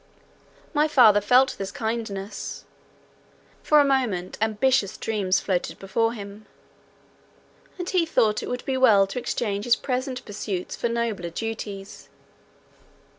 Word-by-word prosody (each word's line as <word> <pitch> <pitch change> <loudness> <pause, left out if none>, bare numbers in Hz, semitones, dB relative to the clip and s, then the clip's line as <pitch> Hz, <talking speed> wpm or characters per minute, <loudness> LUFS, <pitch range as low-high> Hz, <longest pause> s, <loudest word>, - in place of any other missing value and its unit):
My 300 0 +3
father 220 -8 +6
felt 255 +5 +4
this 195 0 -4
kindness; 220 -3 -5 1.0
for 300 - +4
a 290 - +5
moment 245 -10 0
ambitious 220 0 +1
dreams 200 -4 0
floated 185 -3 -2
before 225 +4 0
him; 205 -1 -10 1.3
and 355 -1 -5
he 355 -3 +1
thought 215 -8 +2
that - - -3
it - - -5
would 250 0 -4
be 265 -1 -1
well 220 -7 +6
to 195 +6 -5
exchange 210 -4 -2
his 240 - +4
present 255 -1 -3
pursuits 200 -3 -4
for 235 - -2
nobler 230 -7 -2
duties. 205 0 -6
220 Hz, 130 wpm, -24 LUFS, 200-255 Hz, 1.3 s, father